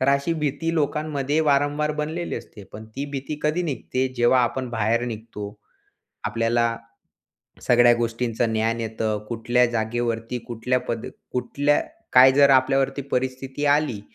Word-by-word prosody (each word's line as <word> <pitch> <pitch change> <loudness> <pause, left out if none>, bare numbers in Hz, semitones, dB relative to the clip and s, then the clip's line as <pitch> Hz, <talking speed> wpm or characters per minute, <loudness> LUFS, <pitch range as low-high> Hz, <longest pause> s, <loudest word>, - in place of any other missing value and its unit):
तर 130 - +1
अशी 140 +4 +2
भीती 155 +2 -2
लोकांमध्ये 150 -1 -1
वारंवार 145 0 +1
बनलेली 165 +3 -4
असते. 105 -3 -10
पण 110 +1 -9
ती 140 - -2
भीती 140 +2 -4
कधी 155 +4 +1
निघते? 130 -4 -2
जेव्हा 120 +2 +4
आपण 130 +2 -3
बाहेर 115 +1 +1
निघतो. 110 -2 -7 0.7
आपल्याला 115 +2 +1 0.9
सगळ्या 120 -1 +5
गोष्टींचं 115 0 -1
ज्ञान 115 +1 0
येतं, 110 -1 -2
कुठल्या 120 +1 +2
जागेवरती, 115 +1 -2
कुठल्या 125 +2 -1
पद, 115 -1 -3 0.3
कुठल्या 145 +3 +1 0.3
काय, 130 +1 +8
जर 140 +1 +5
आपल्यावरती 135 +1 +2
परिस्थिती 130 +2 -2
आली 145 -7 +2
125 Hz, 130 wpm, -23 LUFS, 115-145 Hz, 0.9 s, काय